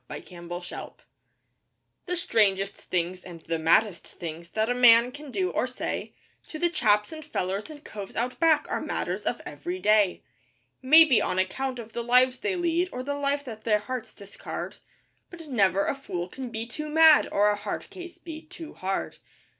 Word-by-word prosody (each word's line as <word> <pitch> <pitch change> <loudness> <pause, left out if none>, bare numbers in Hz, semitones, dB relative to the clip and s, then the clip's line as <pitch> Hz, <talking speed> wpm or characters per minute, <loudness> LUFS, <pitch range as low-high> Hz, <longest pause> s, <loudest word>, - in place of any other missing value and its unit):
THE - - -7
STRANGER'S 175 0 -8
FRIEND - - -8 1.1
The 360 - -1
strangest 200 - +1
things, 180 +1 -3
and 170 -3 -10
the 165 0 -3
maddest 175 +4 +2
things, 170 0 -8
that 220 0 +1
a 245 - +1
man 245 0 +6
can 290 +2 -10
do 370 +7 -1
or - - 0
say, - - -5 0.3
To 310 - -7
the 345 +2 +1
chaps 210 -9 +2
and 315 -1 -8
fellers 195 -7 -3
and 300 -1 -11
coves 200 -2 -8
Out 245 +2 -2
Back 325 -2 +4
are - - -2
matters - - -3
of - - -2
every 355 +1 -5
day; 210 - +3 0.6
Maybe 295 -1 +7
on 185 - -1
account 255 +8 -1
of 230 -2 -9
the 235 - -3
lives 250 +2 +4
they 405 -2 -1
lead, 345 +1 0
or 250 - -5
the 285 +2 -2
life 285 0 -1
that 220 -4 -8
their 215 -2 +3
hearts 250 +3 -6
discard 200 -1 -7 0.5
But 335 -3 -11
never 200 -6 +2
a - - 0
fool 185 -11 -5
can 255 +6 -7
be 225 0 -4
too 300 +6 -6
mad 320 0 +6
or 205 +1 +4
a - - 0
'hard 205 - -6
case' 355 -2 -9
be 320 -2 -9
too 315 0 -10
hard. 190 +1 -3
240 Hz, 185 wpm, -27 LUFS, 195-305 Hz, 1.1 s, Maybe